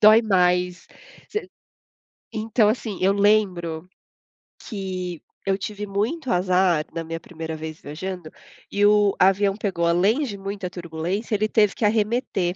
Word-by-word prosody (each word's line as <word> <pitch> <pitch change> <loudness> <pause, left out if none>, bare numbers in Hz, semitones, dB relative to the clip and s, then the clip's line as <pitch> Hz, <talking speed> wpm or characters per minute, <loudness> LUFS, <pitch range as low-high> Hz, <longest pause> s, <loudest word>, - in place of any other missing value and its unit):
Dói 215 +1 +8
mais. 180 -3 +2 0.5
Voc 425 - -1 0.9
então, 220 0 +2
assim, 215 -3 -2
eu 190 +2 +4
lembro 185 -5 +1 0.8
que 185 -5 -4 0.2
eu 195 -1 +1
tive 210 0 -5
muito 225 +9 -2
azar 180 -3 +2
na 165 - -3
minha 165 0 -5
primeira 160 -1 -7
vez 155 0 -7
viajando 170 +2 -6 0.4
e 205 0 +3
o 205 -1 +5
avião 195 +1 +4
pegou, 195 -5 -1
além 195 - +3
de 205 -7 -4
muita 195 -1 -5
turbulência, 175 +5 -3
ele 215 +1 +1
teve 210 -3 +3
que 220 - 0
arremeter 210 -4 +1
195 Hz, 140 wpm, -23 LUFS, 175-210 Hz, 0.9 s, Dói